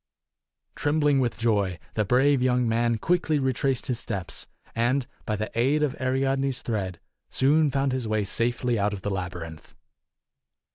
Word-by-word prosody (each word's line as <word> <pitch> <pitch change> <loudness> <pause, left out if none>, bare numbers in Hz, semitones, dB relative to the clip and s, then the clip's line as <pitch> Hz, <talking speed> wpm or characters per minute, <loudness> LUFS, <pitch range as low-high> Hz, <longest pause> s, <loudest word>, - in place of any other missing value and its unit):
Trembling 145 -1 +2
with 120 -3 0
joy, 105 -6 +1 0.2
the 110 - +1
brave 130 +5 +3
young 125 -1 +2
man 115 0 +1
quickly 165 +2 +1
retraced 130 -1 0
his 125 -3 -1
steps, 95 -2 -4 0.3
and 120 +3 +1 0.2
by 110 - 0
the 110 +1 -4
aid 135 +6 +2
of 140 -3 0
Ariadne's 135 0 0
thread 95 -6 -3 0.3
soon 150 +3 +3
found 135 0 0
his 130 -3 -2
way 110 -1 +1
safely 120 +3 0
out 105 +1 +1
of 95 - -6
the 105 - -1
labyrinth. 90 -4 -6
120 Hz, 150 wpm, -26 LUFS, 105-135 Hz, 0.3 s, brave